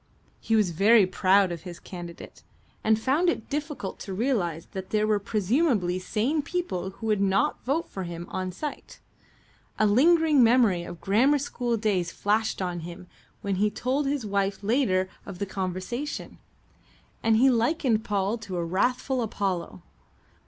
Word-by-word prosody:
He 225 - 0
was 210 -5 +3
very 205 +5 +5
proud 190 0 +3
of 170 -2 -5
his 175 -1 -9
candidate, 175 -2 -10 0.4
and 220 0 +3
found 285 +10 +2
it 285 -6 -3
difficult 295 -8 -4
to 195 - -6
realize 190 - -1
that 190 -1 -6
there 215 0 +1
were 215 -1 +2
presumably 205 - +1
sane 230 +11 0
people 285 - -3
who 195 +4 -10
would 210 -2 +1
not 200 +10 +1
vote 305 +6 0
for 190 - -6
him 170 -1 -6
on 185 -1 -3
sight. 295 - -7 0.8
A 215 - +3
lingering 300 +5 +5
memory 230 -6 +4
of 170 0 -9
grammar 250 +9 +3
school 245 -4 -2
days 195 -6 0
flashed 215 -1 0
on 175 -1 -3
him 175 +2 -9 0.4
when 200 -2 -2
he 210 +2 +2
told 265 +6 -1
his 280 -4 -1
wife 200 -1 -1
later 200 -5 +2 0.2
of 195 -3 -8
the 200 - -2
conversation, 190 +9 -4 0.8
and 225 -1 +3
he 260 +3 +5
likened 235 -2 +1
Paul 205 +2 -1
to 200 -5 -6
a 170 - -1
wrathful 250 +8 0
Apollo. 185 - -3
210 Hz, 160 wpm, -26 LUFS, 185-250 Hz, 0.8 s, very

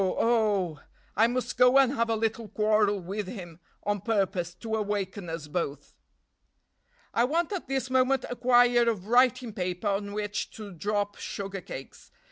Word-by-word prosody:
oh! 200 -5 +1 0.4
I 225 +2 +5
must 250 +1 -3
go 250 +2 +7
and 270 -1 +5
have 230 -3 0
a 225 - +2
little 225 0 -1
quarrel 210 -1 +2
with 195 +3 -4
him 175 -6 -8 0.2
on 205 -1 -1
purpose 195 -5 -1
to 220 +4 -6
awaken 200 -3 -3
us 165 -2 -5
both. 145 -3 -4 1.2
"I 235 - +3
want 320 +8 0
at 385 -7 -4
this 265 -1 -2
moment 260 0 +3
a 245 - -4
quire 245 -1 +4
of 200 -5 -3
writing 245 0 +3
paper 180 +2 -2
on 200 0 -2
which 205 0 -3
to 210 -2 -8
drop 205 +3 -2
sugar 195 -1 -5
cakes. 135 -5 -10
210 Hz, 160 wpm, -28 LUFS, 195-240 Hz, 1.2 s, go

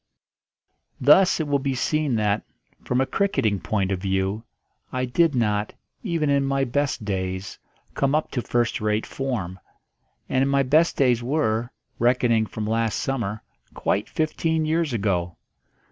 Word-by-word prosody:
Thus 175 +9 +5
it 160 - -1
will 140 -1 +1
be 135 -1 -1
seen 150 0 0
that, 105 -1 +1 0.4
from 125 +1 0
a - - +2
cricketing 130 - 0
point 100 +1 -1
of 95 -2 -2
view, 95 +2 -1 0.5
I 130 0 -1
did 145 +4 +2
not, 105 -3 0 0.3
even 165 -7 -1
in 140 -1 +3
my 135 0 +1
best 135 -3 -1
days, 95 -1 -3 0.3
come 140 +1 +1
up 155 - -1
to 125 - -1
first 120 -2 0
rate 105 +1 0
form; 110 -10 -4 0.7
and 135 +1 +1
my 140 0 +3
best 155 +6 +3
days 125 -3 +3
were, 120 -4 0 0.3
reckoning 120 -2 +2
from 110 0 -5
last 115 0 0
summer, 110 -6 -2 0.3
quite 105 - -1
fifteen 160 0 0
years 160 -1 0
ago. 95 -6 -1
125 Hz, 145 wpm, -24 LUFS, 105-140 Hz, 0.7 s, Thus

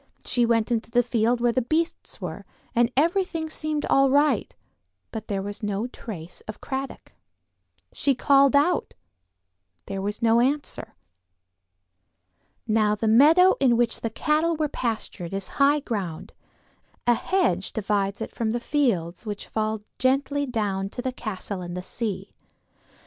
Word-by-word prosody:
She 240 -2 +2
went 230 0 +1
into 230 -1 -1
the 245 +1 +3
field 235 0 +1
where 240 0 +3
the 255 - +1
beasts 315 +7 -2
were, - - -6 0.3
and 240 0 +3
everything 330 0 +1
seemed 310 -2 -2
all 275 0 +4
right, 285 -4 +2 0.6
but 220 -1 -6
there 195 -2 -2
was 205 +2 -6
no 205 +1 -1
trace 180 -9 -8
of 215 - -7
Cradock. 270 0 -5 0.8
She 275 -2 +1
called 275 +2 +4
out; 320 +5 +2 0.9
there 195 0 -4
was 205 +2 -3
no 230 0 +5
answer. 265 -4 -2 1.7
Now 215 -1 +2
the 220 +2 -2
meadow 310 +11 +6
in 250 -4 +4
which 240 -1 0
the 230 - -1
cattle 310 +7 +1
were 310 -1 0
pastured 220 - -4
is 195 -1 -4
high 290 +1 +5
ground; 195 - -4 0.7
a 240 - +5
hedge 235 - 0
divides 200 -2 -1
it - - -4
from 230 -2 -2
the 240 +2 0
fields 220 - -1
which 205 -1 -4
fall 215 -1 -2 0.2
gently 275 +2 +1
down 200 -5 -1
to 245 - -6
the 260 -1 -2
castle 200 -4 -5
and 175 0 -6
the 180 - -5
sea. 195 -2 -4
235 Hz, 150 wpm, -25 LUFS, 210-280 Hz, 1.7 s, meadow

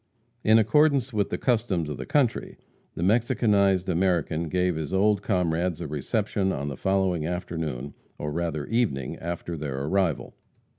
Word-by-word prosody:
In 110 +1 +6
accordance 135 +2 +3
with 105 -2 0
the - - -2
customs 110 - 0
of 75 -3 -5
the - - -7
country, 135 -6 0 0.4
the 85 - -3
Mexicanized 100 -3 +2
American 85 -3 0
gave 90 0 +1
his 80 -2 -4
old 100 +1 +3
comrades 90 -3 0
a - - -4
reception 95 - -1
on 70 -2 -3
the 70 - -5
following 95 -2 0
afternoon, 80 -6 -4 0.2
or 75 - -4
rather 80 -2 -2
evening 105 - -1
after 85 0 -5
their 70 -3 -4
arrival. 90 +1 0
90 Hz, 150 wpm, -26 LUFS, 80-105 Hz, 0.4 s, In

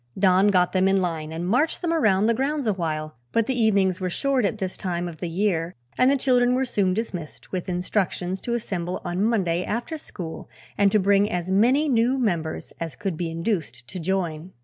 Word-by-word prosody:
Don 190 0 +4
got 180 -3 +3
them 190 0 +3
in 195 0 +3
line 165 -4 -2
and 165 +2 -4
marched 275 - +1
them 335 -1 +1
around 215 -11 +3
the 230 - +3
grounds 275 +3 -1
awhile, 155 - -2
but 230 -1 +2
the 260 - 0
evenings 200 -6 +2
were 185 - 0
short 270 +4 +1
at 205 - -1
this 190 -3 -3
time 175 -2 -3
of 170 -2 -8
the 175 - -4
year 175 -2 0 0.2
and 255 - +4
the 280 - +3
children 250 -2 +3
were 265 +1 +1
soon 195 -6 +1
dismissed 180 -8 -5
with 185 -1 -3
instructions 180 0 -1
to 235 - -2
assemble 180 -6 -3
on 180 +3 -1
Monday 185 -6 +1
after 240 - -3
school 170 - -8 0.3
and 200 -1 +3
to 215 - +4
bring 200 +1 +3
as 180 +1 -2
many 250 +10 +4
new 250 0 +2
members 170 -10 -2
as 165 -5 -4
could 190 -4 -3
be 170 +1 -3
induced 165 - -3
to 185 - -5
join. 175 -1 -2
190 Hz, 205 wpm, -24 LUFS, 175-230 Hz, 0.3 s, Don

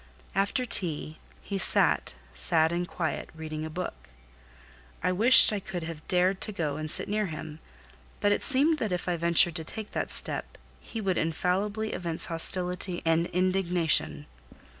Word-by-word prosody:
After 200 +6 -1
tea, 160 -8 -1 0.2
he 200 -1 -4
sat, - - +3 0.2
sad 160 - +1
and 175 +1 -3
quiet, 160 -5 -4
reading 155 -1 -7
a 160 - -6
book. 155 - -7 0.9
I - - +1
wished 220 +4 +7
I 205 - -2
could 185 -3 -7
have 160 -2 -9
dared 185 +1 0
to 215 - +1
go 155 -7 -3
and 155 0 -5
sit - - +3
near 210 0 -2
him, 155 -1 -9 0.6
but 205 - +1
it 205 - 0
seemed 295 +3 +2
that 215 - -3
if 180 0 -4
I 175 - 0
ventured 170 0 +4
to 160 - -1
take 215 +6 -5
that - - -4
step, - - 0 0.2
he 225 - -8
would 190 -3 -1
infallibly 200 +7 -2
evince 170 -2 -1
hostility 180 +1 0
and 165 +1 +1
indignation. 180 -4 0
180 Hz, 160 wpm, -27 LUFS, 160-200 Hz, 0.9 s, wished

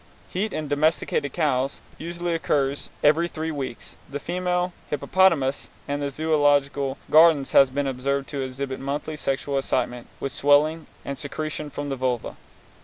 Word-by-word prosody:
Heat 200 +4 -1
in 155 - -3
domesticated 145 -1 +1
cows 140 -4 0 0.2
usually 170 +1 -3
occurs 140 -4 0
every 155 +3 +4
three 160 -1 -4
weeks. 135 -5 -6
The 140 +1 -4
female 180 +1 -1 0.2
hippopotamus 150 -4 +2 0.2
in 145 0 -1
the 145 - -1
Zoölogical 145 -2 +1
Gardens 155 -3 +6
has 135 - +7
been 140 +2 -1
observed 135 +1 -1
to 140 -2 -3
exhibit 130 0 -4
monthly 145 +3 -3
sexual 140 -1 -1
excitement, 125 -2 -2
with 135 - -3
swelling 150 +3 +3 0.2
and 140 - -4
secretion 155 +1 -4
from 145 +1 -5
the 135 - -1
vulva. 125 -2 -2
145 Hz, 145 wpm, -24 LUFS, 135-155 Hz, 0.2 s, has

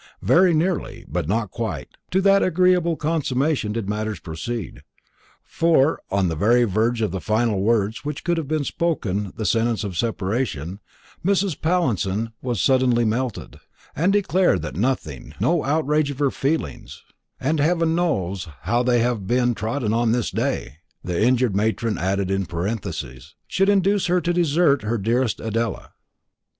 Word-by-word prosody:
Very 175 - +5
nearly, 170 +2 -1
but - - -3
not 105 +1 -1
quite, 90 - -4 0.2
to 190 - +2
that 195 0 +5
agreeable 180 -1 +3
consummation 150 -6 0
did 110 -2 -3
matters 105 -2 -3
proceed; 90 +7 -6 0.6
for, 160 -3 +2
on 100 -1 +1
the 80 - -2
very 120 +9 +3
verge 115 +2 +1
of 105 - 0
the 95 -1 -4
final 110 -1 +1
words 110 +2 +1
which 150 0 -5
could 170 0 0
have 155 -1 -1
spoken 105 - -1
the 110 - -3
sentence 115 +3 +1
of 100 -3 -5
separation, 100 - -2 0.4
Mrs. 190 -4 +1
Pallinson 115 - 0
was 120 -5 -2
suddenly 125 +2 +3
melted, 115 +1 -3 0.4
and 175 +6 +2
declared 190 - +2
that 75 -4 -5
nothing, 100 - -2
no 170 -2 +2
outrage 150 0 +1
of 140 - -5
her 140 -2 +1
feelings 155 +4 -3 0.4
"and 155 +3 0
heaven 165 +2 +2
knows 100 - -1
how 120 +1 +1
they 125 -1 +2
have 115 -5 -1
been 120 0 +2
trodden 110 +1 -2
on 115 0 +2
this 120 -2 -1
day," 65 - -2 0.3
the 90 0 -2
injured 125 -3 +2
matron 110 0 0
added 95 +1 0
in 95 -2 -1
parenthesis 85 - -5
should 195 +1 +1
induce 200 -1 +2
her 180 +1 +3
to 175 0 -1
desert 165 -4 +3
her 110 +3 -1
dearest 115 +3 0
Adela. 115 +1 -3
120 Hz, 155 wpm, -22 LUFS, 100-155 Hz, 0.6 s, Very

